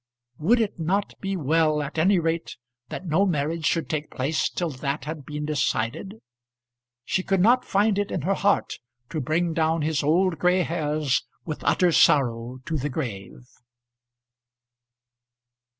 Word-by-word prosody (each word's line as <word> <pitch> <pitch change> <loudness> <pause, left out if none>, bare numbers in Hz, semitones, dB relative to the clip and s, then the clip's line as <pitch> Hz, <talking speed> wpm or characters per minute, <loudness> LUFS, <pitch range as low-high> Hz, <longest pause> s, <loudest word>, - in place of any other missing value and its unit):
Would 225 +11 +3
it 215 -5 -1
not 190 +5 0
be 195 -1 -2
well 155 0 +2
at 150 +3 -4
any 190 +4 +4
rate 165 0 -2 0.3
that 185 - -6
no 170 +3 +2
marriage 160 -3 0
should 165 - 0
take 155 -1 -3
place 140 +5 -1
till 175 -3 -3
that 140 +2 -3
had 150 -3 -6
been 150 0 -4
decided? 150 - -1 0.9
She 185 - 0
could 195 0 0
not 240 +7 +4
find 205 +1 +2
it 205 - -1
in 165 - -3
her 195 +4 +1
heart 200 +1 0 0.3
to 155 - -2
bring 165 +5 0
down 160 0 +1
his 155 0 0
old 165 +2 +2
gray 180 +2 +3
hairs 150 -4 0 0.2
with 155 -3 -5
utter 180 -1 +3
sorrow 125 -5 +3
to 160 - -2
the 145 +1 -2
grave. 120 -5 -6
160 Hz, 150 wpm, -25 LUFS, 150-185 Hz, 0.9 s, any